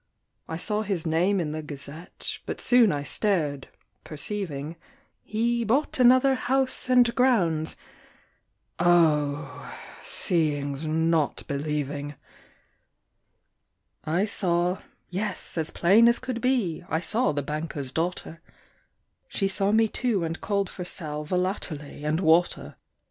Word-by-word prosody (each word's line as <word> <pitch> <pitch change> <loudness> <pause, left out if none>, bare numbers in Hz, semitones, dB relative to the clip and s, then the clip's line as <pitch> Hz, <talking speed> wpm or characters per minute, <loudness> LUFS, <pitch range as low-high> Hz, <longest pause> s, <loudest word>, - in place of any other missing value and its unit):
I 160 - -4
saw 210 +4 -2
his 195 -6 -2
name 175 +5 +2
in 155 -4 -2
the 155 +1 -4
Gazette, 150 +3 -7
But - - -4
soon 245 -5 +5
I 145 -1 -2
stared, 150 -7 0 0.4
perceiving, 155 -2 -5 0.5
He 235 +2 0
bought 275 +6 +1
another 255 +2 +6
house 260 0 +1
and 245 -2 +5
grounds: 180 -12 +2 1.0
Oh! 150 -4 +2 0.3
seeing's 150 -3 -1
not 160 -1 +1
believing! 145 0 -3 1.9
I 170 +6 +1
saw 180 -3 0 0.3
yes, 200 +2 -3
as 160 -2 -1
plain 205 +7 +5
as 235 - +4
could 255 -2 -4
be, 245 -12 0
I 160 - +1
saw 225 +9 +1
the 145 -1 -2
banker's 150 -2 -4
daughter; 165 0 -3 0.9
She 195 - 0
saw 195 +1 +1
me, 220 +1 +4
too, 220 -5 0
and 165 +1 -4
called 200 -1 0
for 180 - -7
sal 150 -4 -4
Volatile 180 -1 -1
and 150 +2 -3
water. 170 +1 +2
175 Hz, 120 wpm, -26 LUFS, 150-215 Hz, 1.9 s, another